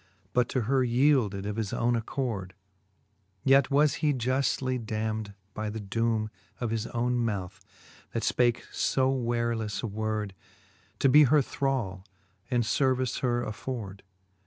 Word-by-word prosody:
But 125 -1 +2
to 130 - 0
her 130 +3 +2
yeelded 120 -6 +2
of 105 +1 -3
his 110 -3 -2
owne 120 +1 +1
accord; 110 -6 -3 0.9
Yet 135 0 +5
was 145 +1 +4
he 150 -3 +2
juftly 130 0 0
damned 110 -1 -3 0.2
by 110 0 -3
the 110 +1 -5
doome 110 +1 0 0.3
Of 120 -3 -2
his 115 -1 -1
owne 120 0 0
mouth, 100 -6 -2 0.5
that - - -2
fpake 120 -1 +2
fo 130 0 +1
warelefTe 115 -4 -1
word, 110 -2 -2 0.6
To - - +3
be 150 +3 +7
her 145 +2 +4
thrall, 120 -10 -2 0.5
and 120 -2 +2
fervice 130 +1 +1
her 120 -1 0
afford. 110 -3 -5
120 Hz, 135 wpm, -28 LUFS, 110-130 Hz, 0.9 s, be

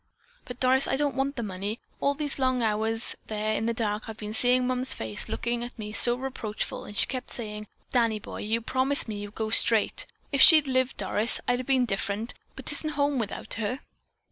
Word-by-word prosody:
But, 245 0 -9
Doris, 260 +1 +4
I - - +1
don't 285 0 0
want 275 +2 -1
the 235 - -3
money. 200 +2 -4 0.2
All 280 0 +1
these 290 -1 0
long 255 -2 +1
hours 220 +1 0
there 215 0 -2
in 220 +1 -1
the - - +1
dark 215 -1 -2
I've 220 - -7
been 210 0 -6
seeing 250 +2 +3
Mom's 255 +1 +1
face 110 -2 -2
looking 235 0 -2
at 240 +1 -8
me 210 -1 -7
so 240 +1 +5
reproachful, 250 -4 -5
and 205 - -9
she - - +5
kept 255 -1 -5
saying, 210 -2 -6 0.2
'Danny 230 -3 +2
boy, 210 - -8
you 225 +2 -1
promised 260 +4 +1
me 215 -2 -4
you'd 205 0 -8
go 220 -1 -3
straight.' 225 -1 +2 0.2
If 280 -2 +2
she'd 310 -3 +9
a - - -2
lived, 260 0 +1
Doris, 205 +3 +1
I'd 245 0 +2
have 255 - -6
been 260 -2 +3
different, 205 +2 -3 0.2
but 265 - -9
'tisn't 305 +1 +1
home 285 -2 +1
without 220 -1 -3
her." 250 +6 -2
235 Hz, 215 wpm, -27 LUFS, 215-260 Hz, 0.2 s, she'd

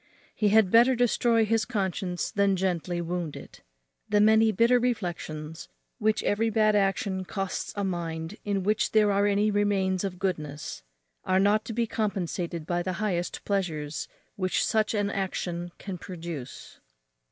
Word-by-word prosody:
He 215 - +1
had 210 -2 +4
better 240 +3 +6
destroy 235 -1 +3
his 225 +1 +2
conscience 190 -5 -2
than 200 -1 +2
gently 175 -2 -1
wound 170 -2 -3
it. - - -11 0.5
The 210 - +3
many 220 +1 +5
bitter 235 +4 +4
reflections 170 -9 -3 0.3
which 215 -1 +1
every 225 +2 +1
bad 215 -1 +3
action 195 -1 0
costs 195 0 -4
a 200 - -2
mind 170 0 -3
in 200 -2 -1
which 210 +3 +1
there 210 -1 +4
are 200 +1 +3
any 205 +1 +2
remains 200 -2 +1
of 190 -2 -3
goodness 155 -6 -4 0.4
are 185 0 +2
not 205 +2 +3
to 230 - -5
be 235 +1 +1
compensated 180 -6 -2
by 175 +1 -1
the 185 +1 -2
highest 180 -3 -2
pleasures 160 -7 -2 0.3
which 185 -2 +1
such 220 0 +1
an 205 -1 0
action 175 -3 -3
can 190 -3 -6
produce. 165 -8 -8
195 Hz, 150 wpm, -27 LUFS, 175-215 Hz, 0.5 s, better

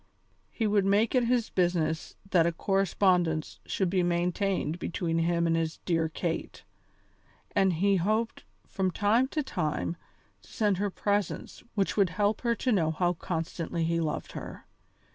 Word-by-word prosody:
He 225 - -2
would 205 -1 +3
make 200 +3 +3
it 250 -2 +3
his 235 -1 +1
business 175 -3 0 0.2
that 170 -2 +5
a - - +2
correspondence 180 -3 +1
should 190 -3 0
be 185 -1 +2
maintained 175 -1 0
between 165 -2 -1
him 170 0 +1
and 165 0 +2
his 165 -1 -1
dear 165 -2 +1
Kate, 165 +1 -4 0.9
and 195 -2 +4
he 195 +4 +2
hoped 215 +6 0 0.2
from 190 -2 -1
time 215 +7 +2
to 300 +2 -2
time 170 - -2 0.5
to - - -19
send 210 -4 +1
her 205 +2 0
presents 205 +1 -2
which 200 0 0
would 195 -3 +4
help 205 +4 0
her 235 -1 +1
to 255 - 0
know 170 -7 +2
how 175 +2 +1
constantly 165 0 -3
he 165 +1 +1
loved 155 -2 -2
her. - - -8
185 Hz, 160 wpm, -29 LUFS, 165-205 Hz, 0.9 s, that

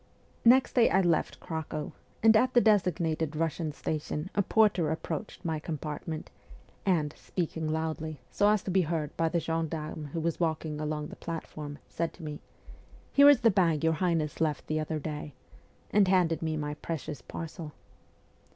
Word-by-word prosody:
Next 255 +3 +6
day 240 -2 +5
I 190 - +4
left 170 -3 +1
Cracow; 160 -2 -4 0.3
and 225 0 +7
at 255 +3 +3
the - - +9
designated 170 -8 +2
Russian 160 0 -1
station 155 +2 -3
a 205 - +2
porter 200 -6 +3
approached 170 +5 -4
my 160 -2 -1
compartment, 155 0 -5 0.6
and, 155 -6 +2
speaking 160 -3 -3
loudly, 160 -1 -3
so 205 0 +3
as 210 -2 +2
to 190 - -3
be 190 +1 +4
heard 160 -3 -2
by 165 0 +1
the 170 - +1
gendarme 160 -1 -3
who 165 - -1
was 165 0 -1
walking 160 -2 -1
along 150 0 -3
the - - -9
platform, 155 -3 -6
said 165 0 -3
to 170 - -13
me, 150 -1 -5 0.4
' - - -25
Here 280 +1 +8
is 280 -4 +6
the 230 -2 +5
bag 170 -5 +2
your 160 0 +3
highness 165 -3 0
left 155 -3 0
the 155 0 -1
other 155 0 -2
day/ 150 -2 -5 0.6
and 205 -2 +5
handed 180 -3 +3
me 160 -1 -1
my 150 -1 -2
precious 150 -3 -5
parcel. 160 +1 -7
160 Hz, 170 wpm, -29 LUFS, 155-180 Hz, 0.6 s, the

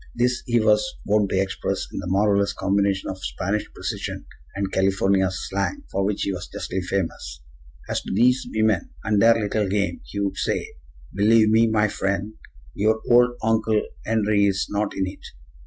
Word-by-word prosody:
This 125 +1 +1
he 120 -1 +3
was 110 +11 +2
wont 105 -1 +2
to 95 - +1
express 95 -1 -2
in - - -4
that 90 - -5
marvelous 100 +1 +2
combination 100 0 0
of 95 0 -10
Spanish 100 +3 -2
precision - - -5 0.3
and 95 -1 -2
California 95 0 +2
slang 100 - -3
for 100 - 0
which 100 +1 -1
he 100 - -1
was 90 -1 -6
justly 95 - -4
famous. 80 -10 -4 0.4
"As - - -1
to - - -7
thees 125 +6 +3
women 110 -4 +1
and 105 -2 +2
their 115 0 +6
little 105 -1 0
game," 100 0 -1
he 100 - -6
would 100 -1 -2
say, - - -1 0.4
"believe 110 +2 +4
me, 115 +1 +5
my 110 -1 +2
friend, 100 +1 -2 0.4
your 110 +2 +1
old 120 0 +5
Oncle 110 -1 +2 0.2
'Enry 105 -2 +2
is 95 -1 0
not 105 0 -1
in 95 - +1
it. 95 - -8
100 Hz, 170 wpm, -23 LUFS, 95-110 Hz, 0.4 s, their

